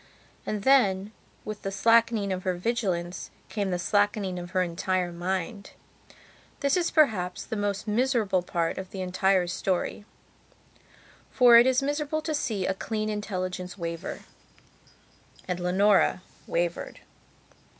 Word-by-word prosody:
And 210 Hz, -2 st, -2 dB
then, 210 Hz, -7 st, +3 dB, 0.3 s
with 215 Hz, -1 st, -6 dB
the 195 Hz, -, -3 dB
slackening 225 Hz, -1 st, +3 dB
of 185 Hz, -, -4 dB
her 185 Hz, -1 st, -1 dB
vigilance, 180 Hz, -4 st, -2 dB, 0.2 s
came 205 Hz, -3 st, -2 dB
the 180 Hz, -, 0 dB
slackening 205 Hz, 0 st, 0 dB
of 175 Hz, 0 st, -7 dB
her 185 Hz, 0 st, +1 dB
entire 180 Hz, +1 st, -1 dB
mind. 185 Hz, +3 st, -4 dB, 0.9 s
This 280 Hz, -1 st, +2 dB
is 350 Hz, -2 st, +1 dB
perhaps 210 Hz, -, +1 dB
the -, -, -4 dB
most 205 Hz, 0 st, -2 dB
miserable 215 Hz, -4 st, +1 dB
part 170 Hz, -1 st, -2 dB
of 190 Hz, -1 st, -7 dB
the 190 Hz, -, -6 dB
entire 185 Hz, 0 st, +2 dB
story. 180 Hz, +3 st, -2 dB, 1.3 s
For 245 Hz, -2 st, +6 dB
it 240 Hz, -, +5 dB
is 260 Hz, +1 st, +2 dB
miserable 295 Hz, +2 st, -1 dB
to 315 Hz, -, -2 dB
see 215 Hz, -10 st, -1 dB
a -, -, +1 dB
clean 215 Hz, +2 st, -3 dB
intelligence 185 Hz, -3 st, -4 dB
waver; 170 Hz, 0 st, -5 dB, 1.3 s
and 180 Hz, -1 st, -2 dB
Leonora 185 Hz, +1 st, +3 dB, 0.2 s
wavered. 170 Hz, 0 st, -2 dB
195 Hz, 130 wpm, -27 LUFS, 180-220 Hz, 1.3 s, For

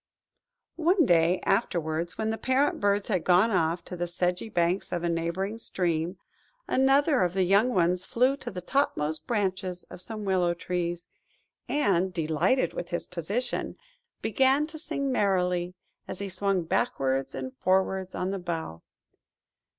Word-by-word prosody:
One 345 Hz, +1 st, +4 dB
day 175 Hz, -1 st, +3 dB
afterwards, 170 Hz, -5 st, 0 dB
when 220 Hz, 0 st, -1 dB
the 225 Hz, -, -4 dB
parent 265 Hz, +3 st, +1 dB
birds 205 Hz, 0 st, +1 dB
had 185 Hz, -5 st, +1 dB
gone 185 Hz, +5 st, +4 dB
off 165 Hz, -2 st, 0 dB
to 180 Hz, -, -6 dB
the 175 Hz, 0 st, -2 dB
sedgy 180 Hz, +4 st, -1 dB
banks 175 Hz, 0 st, 0 dB
of 175 Hz, -1 st, -2 dB
a 170 Hz, -, +1 dB
neighbouring 170 Hz, +6 st, -2 dB
stream, 175 Hz, -3 st, -1 dB, 0.5 s
another 275 Hz, +2 st, +3 dB
of 180 Hz, -1 st, +1 dB
the 190 Hz, -, +3 dB
young 200 Hz, +6 st, +4 dB
ones 180 Hz, 0 st, +2 dB
flew 255 Hz, +7 st, +2 dB
to -, -, -6 dB
the 180 Hz, -2 st, -6 dB
topmost 155 Hz, -, 0 dB
branches 190 Hz, -5 st, -1 dB
of -, -, -9 dB
some 215 Hz, +2 st, -5 dB
willow 180 Hz, -3 st, +2 dB
trees, 175 Hz, -1 st, -3 dB, 0.6 s
and, 190 Hz, -10 st, +2 dB
delighted 165 Hz, -, +1 dB
with 175 Hz, -, -5 dB
his 175 Hz, -, -2 dB
position, 200 Hz, +9 st, -3 dB, 0.5 s
began 265 Hz, +6 st, +3 dB
to 315 Hz, 0 st, -9 dB
sing 280 Hz, -3 st, -2 dB
merrily, 180 Hz, -5 st, +1 dB, 0.3 s
as -, -, -5 dB
he 200 Hz, 0 st, -4 dB
swung 195 Hz, -1 st, 0 dB
backwards 135 Hz, -, 0 dB
and 260 Hz, 0 st, -5 dB
forwards 190 Hz, -1 st, +1 dB
on 185 Hz, +2 st, -2 dB
a 195 Hz, -, -3 dB
bough. 165 Hz, -, -5 dB
185 Hz, 150 wpm, -27 LUFS, 175-220 Hz, 0.6 s, One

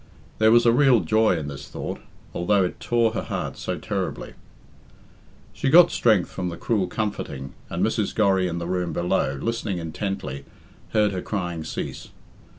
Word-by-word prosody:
There 110 Hz, 0 st, +5 dB
was 120 Hz, +1 st, +5 dB
a 115 Hz, -, +6 dB
real 130 Hz, -2 st, +5 dB
joy 110 Hz, -4 st, +3 dB
in 75 Hz, -2 st, -4 dB
this 70 Hz, -1 st, -7 dB
thought, -, -, -5 dB, 0.3 s
although 95 Hz, +3 st, +2 dB
it 90 Hz, -, -3 dB
tore 115 Hz, -2 st, +2 dB
her 110 Hz, -, -2 dB
heart -, -, -4 dB
so -, -, -4 dB
terribly. -, -, -4 dB, 1.2 s
She 135 Hz, -, -1 dB
got 175 Hz, +4 st, +8 dB
strength 110 Hz, -7 st, +3 dB
from 90 Hz, -, -3 dB
the 85 Hz, -, -7 dB
cruel 105 Hz, -6 st, 0 dB
comforting, 70 Hz, -12 st, -4 dB, 0.2 s
and -, -, 0 dB
Mrs. -, -, -1 dB
Gorry 95 Hz, -3 st, +3 dB
in 85 Hz, -1 st, -3 dB
the 85 Hz, -, -4 dB
room 90 Hz, -1 st, -2 dB
below, 80 Hz, -5 st, 0 dB
listening 115 Hz, -2 st, -2 dB
intently, 80 Hz, -4 st, -4 dB, 0.5 s
heard 105 Hz, -2 st, +3 dB
her 95 Hz, -2 st, -3 dB
crying 90 Hz, -6 st, -3 dB
cease. 80 Hz, -, -5 dB
95 Hz, 165 wpm, -24 LUFS, 85-110 Hz, 1.2 s, got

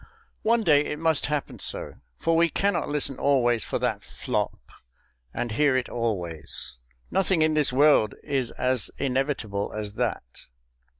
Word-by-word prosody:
One 230 Hz, +1 st, +2 dB
day 150 Hz, -5 st, +5 dB
it 150 Hz, -, -3 dB
must 160 Hz, -1 st, +1 dB
happen 150 Hz, -1 st, -3 dB
so. -, -, -2 dB, 0.2 s
For 165 Hz, -, +1 dB
we 170 Hz, +1 st, +4 dB
cannot 190 Hz, 0 st, 0 dB
listen 145 Hz, -2 st, -1 dB
always 120 Hz, -5 st, +2 dB
for -, -, -2 dB
that -, -, -1 dB
FLOP, -, -, -3 dB, 0.7 s
and 120 Hz, -, -3 dB
hear 140 Hz, +3 st, +3 dB
it 130 Hz, -, -2 dB
always; 85 Hz, -, -2 dB, 0.3 s
nothing 190 Hz, -4 st, +2 dB
in 155 Hz, 0 st, +2 dB
this 150 Hz, -3 st, +2 dB
world 135 Hz, -5 st, +4 dB
is 135 Hz, -5 st, -1 dB
as 130 Hz, -2 st, 0 dB
inevitable 130 Hz, -7 st, -1 dB
as 105 Hz, -1 st, -4 dB
that. -, -, -4 dB
135 Hz, 145 wpm, -26 LUFS, 115-150 Hz, 0.7 s, day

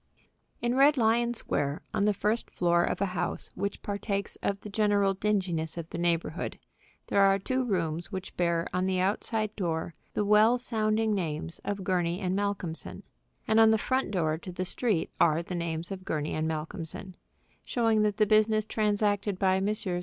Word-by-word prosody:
In 240 Hz, 0 st, +1 dB
Red 280 Hz, +3 st, +5 dB
Lion 235 Hz, +1 st, +2 dB
Square, 145 Hz, -9 st, -1 dB
on 200 Hz, -, +1 dB
the 210 Hz, -, +3 dB
first 215 Hz, +4 st, -1 dB
floor 175 Hz, -1 st, +2 dB
of -, -, -1 dB
a -, -, +3 dB
house 175 Hz, -1 st, -2 dB
which 200 Hz, +1 st, -4 dB
partakes 200 Hz, 0 st, -3 dB
of 200 Hz, 0 st, -1 dB
the -, -, -8 dB
general 205 Hz, -1 st, +2 dB
dinginess 185 Hz, -6 st, -1 dB
of 165 Hz, -2 st, -5 dB
the 170 Hz, -, -4 dB
neighborhood, 170 Hz, -1 st, -1 dB, 0.5 s
there 200 Hz, -, +2 dB
are 195 Hz, 0 st, +5 dB
two 255 Hz, +7 st, -1 dB
rooms 175 Hz, -5 st, -2 dB
which 190 Hz, -1 st, -6 dB
bear 170 Hz, -1 st, +1 dB
on 185 Hz, +1 st, +1 dB
the 185 Hz, -1 st, 0 dB
outside 215 Hz, +3 st, -1 dB
door 165 Hz, -3 st, -2 dB, 0.2 s
the 210 Hz, -, +1 dB
well 215 Hz, +4 st, +5 dB
sounding 220 Hz, -2 st, 0 dB
names 165 Hz, -3 st, -3 dB
of 200 Hz, -1 st, -3 dB
Gurney 180 Hz, -2 st, 0 dB
& -, -, 0 dB
Malcolmson; 195 Hz, -4 st, -3 dB, 0.4 s
and 220 Hz, -, +4 dB
on 225 Hz, 0 st, +7 dB
the 220 Hz, -, +4 dB
front 260 Hz, +2 st, 0 dB
door 160 Hz, -5 st, 0 dB
to 185 Hz, -, -8 dB
the 185 Hz, +1 st, -3 dB
street 205 Hz, -2 st, 0 dB
are 165 Hz, 0 st, +4 dB
the 180 Hz, -, -6 dB
names 170 Hz, 0 st, -3 dB
of 190 Hz, -1 st, -6 dB
Gurney 155 Hz, -4 st, -2 dB
& 160 Hz, -, 0 dB
Malcolmson, 160 Hz, +4 st, -5 dB, 0.5 s
showing 225 Hz, -3 st, +2 dB
that 210 Hz, -1 st, +1 dB
the 215 Hz, -, +4 dB
business 215 Hz, 0 st, +3 dB
transacted 205 Hz, -2 st, 0 dB
by 190 Hz, 0 st, +2 dB
Messrs. 195 Hz, -3 st, -1 dB
195 Hz, 180 wpm, -29 LUFS, 175-215 Hz, 0.5 s, on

